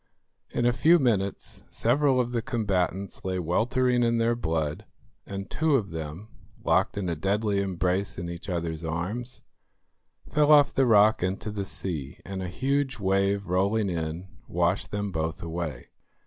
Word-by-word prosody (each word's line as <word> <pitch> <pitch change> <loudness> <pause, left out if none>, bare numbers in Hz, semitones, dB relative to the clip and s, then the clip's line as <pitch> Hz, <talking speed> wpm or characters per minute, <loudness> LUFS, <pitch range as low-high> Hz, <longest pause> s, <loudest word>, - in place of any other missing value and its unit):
In 120 - -1
a 120 - +4
few 165 +7 +5
minutes 105 - -1
several 130 +2 +2
of 120 -1 0
the 120 -1 0
combatants 100 -4 -1
lay 95 -1 -1
weltering 120 +8 +1
in 115 -1 +2
their 115 +1 +2
blood, 80 -7 -2 0.4
and 100 0 -5
two 160 -2 +1
of 105 -8 0
them, 80 +5 -6 0.4
locked 90 +4 +2
in 100 -3 -2
a 85 - -1
deadly 100 +4 0
embrace 95 0 -1
in 85 - -4
each 85 +3 -7
other's 85 -2 -3
arms, 100 +10 -4 0.8
fell 150 0 +3
off 145 -2 +6
the 135 -1 +3
rock 110 -1 +5
into 95 +4 -2
the 100 -2 -3
sea, 80 -8 -5
and 95 -1 -5
a 90 - -3
huge 135 +7 0
wave 100 0 +1
rolling 100 +3 +1
in 80 +2 -3 0.2
washed 90 +2 0
them 105 -1 -3
both 80 +2 -3
away. 80 -6 -5
100 Hz, 160 wpm, -27 LUFS, 85-115 Hz, 0.8 s, off